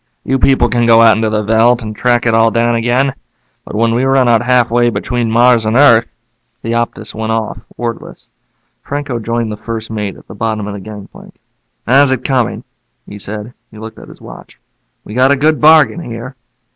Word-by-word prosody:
You 135 0 -1
people 130 -3 +3
can 120 0 0
go 115 0 +6
out 110 -2 +6
into 110 0 -1
the 105 0 -1
veldt 115 +3 +2
and 110 -1 -7
track 120 +1 0
it 115 - +2
all 115 0 +4
down 120 +1 0
again. 120 +4 0 0.5
But - - -9
when 115 +1 +1
we 120 +2 0
run 135 -1 +2
out 115 -2 +3
halfway 120 -1 +2
between 120 0 -2
Mars 120 0 +3
and 110 +1 -1
Earth 115 -5 +5 0.3
" 120 0 -50
The 115 - -3
Optus 115 -2 -3
went 110 0 -4
off, 110 -4 -3 0.2
wordless. 120 -1 -7 0.5
Franco 145 -4 -4
joined 115 0 -3
the 105 - -6
first 110 +1 -6
mate 105 -3 -4
at - - -19
the - - -11
bottom 110 -3 -3
of 105 - -6
the 100 - -7
gangplank. 105 0 -12 0.5
"How's 135 +2 +4
it 130 - -2
coming?" 130 -4 -1 0.4
he 105 - -11
said. 105 +3 -7 0.2
He 110 - -15
looked 110 +1 -10
at - - -13
his - - -15
watch. - - -13 0.5
"We 105 - -10
got 130 +3 +3
a - - +4
good 155 +2 +1
bargain 155 -4 +5
here." 125 -3 -8
115 Hz, 205 wpm, -14 LUFS, 110-125 Hz, 0.5 s, go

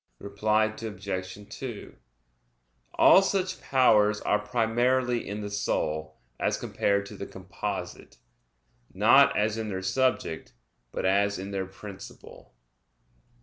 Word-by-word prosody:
Reply 105 - +1 0.2
Obj. 95 -3 -5 0.2
2: 120 -2 -8 1.0
All 190 - +7
such 190 -1 -1
powers 105 -5 +3
are 105 - +1
primarily 120 +2 0
in 105 +1 -4
the 105 - -5
soul, 80 -6 -2 0.2
as - - 0
compared 100 0 0
to - - -10
the - - -7
composite; - - -6 0.7
not 120 +8 +5
as 105 +1 0
in 110 -1 -3
their 95 -1 -4
subject, 130 -7 -1 0.4
but - - -3
as 100 +2 +2
in 95 +2 -6
their 95 -1 -3
principle. 95 - -12
105 Hz, 115 wpm, -27 LUFS, 100-120 Hz, 1.0 s, All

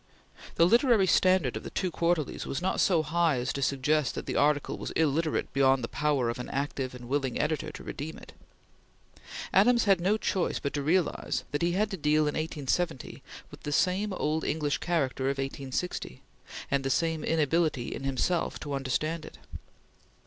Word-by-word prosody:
The 165 - +5
literary 235 0 +4
standard 185 -7 +3
of 110 - -4
the - - -7
two 185 -2 -2
Quarterlies 170 -4 -1
was 135 - -2
not 185 +2 -1
so 170 -5 +3
high 165 -2 +1
as 125 +2 -2
to 140 - -4
suggest 140 +1 +1
that - - -5
the - - -3
article 145 0 +2
was - - -4
illiterate 160 0 0
beyond 135 -2 +3
the - - -1
power 145 -3 0
of 120 +1 -3
an 125 - -6
active 135 -2 -3
and 120 -1 -10
willing 135 -1 -1
editor 150 -1 -1
to - - -10
redeem 155 +3 -6
it. - - -13 1.2
Adams 235 +5 +5
had 195 -4 +3
no 200 +5 +2
choice 190 -4 -1
but 140 - -3
to 145 - -1
realize 170 +4 0
that 145 - -1
he 170 0 +1
had 210 +3 0
to 195 - -3
deal 155 0 +2
in 150 -1 0
1870 155 -1 -2 0.3
with - - -12
the 145 - -4
same 190 +7 +1
old 155 -3 -1
English 150 -2 -1
character 140 -6 -1
of 135 0 0
1860, 135 - -4 0.5
and 140 0 +1
the 135 - -1
same 160 +3 0
inability 160 -4 +1
in - - -6
himself 135 +6 0
to 145 -2 -5
understand 145 +4 -1
it. - - -11
150 Hz, 185 wpm, -28 LUFS, 135-175 Hz, 1.2 s, The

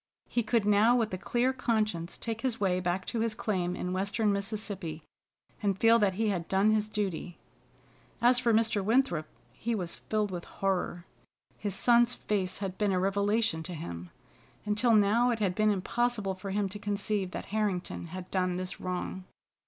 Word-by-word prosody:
He 240 - 0
could 225 -1 +1
now 210 +4 +5
with 225 -5 0
a - - -1
clear 245 +6 +1
conscience 215 -9 -1
take 225 -1 -4
his 255 -4 -1
way 185 -3 +1
back 185 +1 -1
to 235 - -3
his 225 -1 0
claim 180 -5 -1
in 180 0 -3
western 200 +3 +1
Mississippi, 200 -6 -3 0.6
and 200 -3 +1
feel 230 +2 +5
that 200 -3 +3
he 215 +3 0
had 180 -4 -2
done 195 +3 +3
his 215 0 +1
duty. 190 -4 -3 0.8
As 245 +1 +5
for 240 -2 +2
Mr. 220 -2 +2
Winthrop, 210 -8 +2 0.3
he 235 +1 -2
was 180 -5 -3
filled 210 -2 -2
with 175 -2 -5
horror. 185 -2 -2 0.5
His 205 -3 -2
son's 240 +2 +4
face 190 -3 -2
had 190 -2 -5
been 205 -2 +2
a 185 - +1
revelation 200 -1 +1
to 175 +2 -6
him. 85 - -7 0.6
Until 215 +3 +3
now 215 +4 +4
it 235 - +1
had 200 -4 0
been 215 +3 +2
impossible 210 +1 0
for 190 +1 -7
him 200 +1 0
to 205 +2 -7
conceive 205 -1 -1
that - - -6
Harrington 200 -6 -1
had 185 +2 -8
done 185 -1 +1
this 185 0 -5
wrong. 185 0 -4
205 Hz, 180 wpm, -30 LUFS, 185-220 Hz, 0.8 s, now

